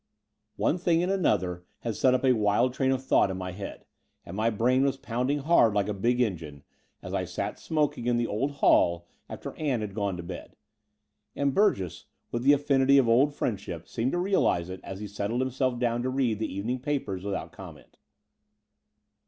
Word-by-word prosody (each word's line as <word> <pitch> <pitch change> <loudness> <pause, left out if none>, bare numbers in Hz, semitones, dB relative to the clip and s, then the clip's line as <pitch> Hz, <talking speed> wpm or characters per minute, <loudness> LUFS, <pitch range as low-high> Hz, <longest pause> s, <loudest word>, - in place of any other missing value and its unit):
One 180 - +1
thing 170 -1 +2
and 185 - 0
another 95 - 0 0.2
had 115 -2 -3
set 130 +4 +3
up 130 - 0
a 130 - +5
wild 110 +3 +2
train 130 0 +1
of 130 0 -2
thought 100 - +4
in 95 - -4
my 95 0 -5
head, 95 +2 -8 0.4
and 85 - -8
my 110 +2 +1
brain 120 +4 +2
was 135 -1 +1
pounding 125 +3 -1
hard 140 -7 +3
like 100 -1 +1
a 105 - -1
big 120 +5 0
engine, 80 - -3 0.4
as - - -7
I - - 0
sat - - -4
smoking 150 -6 -1
in 120 -1 +2
the 120 - +1
old 115 +6 -1
hall 85 -10 +3 0.2
after - - -7
Ann 140 -7 -1
had 105 -2 -5
gone 100 -3 -2
to 85 - -6
bed: 85 +1 -8 0.8
and 140 -1 0
Burgess, 100 - +1 0.3
with 120 - -2
the 140 +3 +6
affinity 140 -1 +3
of 135 -4 +4
old 135 +6 +4
friendship, 95 - -4
seemed 120 +3 -2
to - - +1
realize 175 - +1
it 95 - -7
as 95 +1 -7
he 105 - -4
settled 105 +4 -2
himself 130 -1 0
down 120 -1 0
to 130 - -1
read 130 -5 0
the 110 - -2
evening 115 +7 -3
papers 125 -9 -3
without 100 -1 -4
comment. - - -13
120 Hz, 195 wpm, -27 LUFS, 100-135 Hz, 0.8 s, the